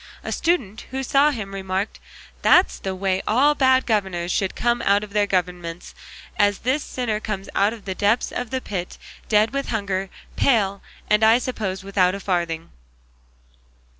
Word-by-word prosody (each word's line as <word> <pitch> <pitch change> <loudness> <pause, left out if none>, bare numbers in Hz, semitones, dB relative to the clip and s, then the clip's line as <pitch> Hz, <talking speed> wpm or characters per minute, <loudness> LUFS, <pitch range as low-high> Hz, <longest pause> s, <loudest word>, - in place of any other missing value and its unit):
A - - -4
student 250 - -1
who 265 +1 -3
saw 280 +3 +4
him 215 -8 -5
remarked, 190 +1 -3 0.4
"That's 360 - +4
the 190 -1 -4
way 190 0 0
all 270 +7 +4
bad 260 -2 +3
governors 190 -6 -1
should 190 +1 -1
come 240 0 +1
out 205 -2 +3
of 205 -1 -10
their 205 -1 +2
governments, 180 -2 -3 0.5
as 205 -1 +3
this 270 +4 +1
sinner 230 -4 -2
comes 210 -3 -5
out 200 +2 +3
of 225 -3 -10
the 190 - -2
depths 205 +5 +1
of 245 -2 -4
the 260 +1 -2
pit, 180 -6 -5 0.3
dead 215 +1 +3
with 275 0 -2
hunger, 195 -3 -2 0.3
pale, 200 -6 +2 0.3
and 210 +1 +3
I 220 +2 +7
suppose 205 -7 -3
without 195 -1 +2
a - - -5
farthing." 170 -4 -2
205 Hz, 165 wpm, -22 LUFS, 190-240 Hz, 0.5 s, I